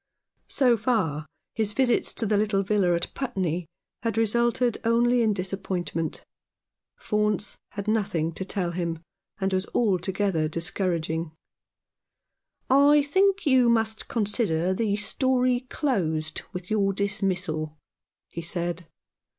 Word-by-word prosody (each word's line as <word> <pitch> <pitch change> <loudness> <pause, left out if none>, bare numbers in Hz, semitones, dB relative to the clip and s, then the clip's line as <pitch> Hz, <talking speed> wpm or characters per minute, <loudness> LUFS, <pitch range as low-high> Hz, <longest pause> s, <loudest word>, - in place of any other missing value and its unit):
So 250 -4 +4
far 185 - 0 0.3
his 215 -2 -1
visits 245 -1 +2
to 225 - -2
the 210 0 +1
little 200 -1 +1
villa 190 -3 +2
at 170 - -3
Putney 180 - -2 0.3
had 230 -2 -2
resulted 235 +1 +2
only 240 +1 +3
in 220 -2 +3
disappointment. 185 -4 -2 0.8
Faunce 210 -1 0
had 200 0 -5
nothing 195 -7 0
to 190 - -4
tell 185 -2 -2
him, 170 -2 -3 0.4
and 190 -1 0
was 185 +1 0
altogether 190 -5 +1
discouraging. 165 -1 -1 0.8
" - - -52 0.2
I 295 -1 +5
think 385 +6 +2
you 260 -4 +5
must 220 -1 +1
consider 200 -6 0
the 205 +1 0
story 250 +3 +1
closed 160 - -1
with 180 +1 -7
your 200 -2 +2
dismissal," 185 -6 -1 0.5
he 170 - -6
said. 170 0 -4
200 Hz, 120 wpm, -26 LUFS, 175-230 Hz, 0.8 s, I